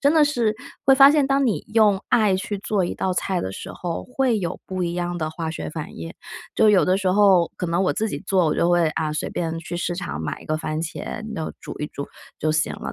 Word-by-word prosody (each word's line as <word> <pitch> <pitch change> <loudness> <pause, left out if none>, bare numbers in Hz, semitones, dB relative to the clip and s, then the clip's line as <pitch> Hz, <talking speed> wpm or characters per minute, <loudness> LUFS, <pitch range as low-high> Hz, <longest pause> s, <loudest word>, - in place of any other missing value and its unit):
真 285 +2 +4
的 310 -2 +6
是 235 -7 +1 0.3
会 270 - +7
发 275 +1 +9
现， 295 -2 +3
当 275 -1 +2
你 195 -10 -1
用 210 -4 +5
爱 210 -4 +4
去 200 +1 -4
做 195 -1 0
一 - - -3
道 185 - -1
菜 185 0 -1
的 95 - -3
时 - - -7
候， 175 -2 -4
会 250 -3 +1
有 180 -2 -3
不 185 -1 -3
一 170 -1 -1
样 175 0 -2
的 155 -1 -2
化 160 0 -4
学 160 - -5
反 155 -1 -7
应， 80 0 -7 0.4
就 220 - +5
有 200 -3 +5
的 185 +1 +3
时 190 -2 +1
候 190 -4 +5
可 180 - -3
能 170 +3 +1
我 185 - +2
自 220 - -1
己 - - -4
做， 185 -4 +3
我 - - +1
就 170 - +2
会， 175 -2 +4
啊， 155 -1 -2
随 155 - -3
便 165 -1 -2
去 165 +1 -6
市 175 0 -2
场 75 - -4
买 80 -2 -4
一 - - -15
个 155 - -1
番 155 0 -3
茄， 195 +6 -5
弄 160 - -4
煮 - - -7
一 150 - -2
煮 140 - -6 0.3
就 155 0 0
行 155 0 +1
了。 - - -6
180 Hz, 280 characters per minute, -23 LUFS, 160-215 Hz, 0.4 s, 发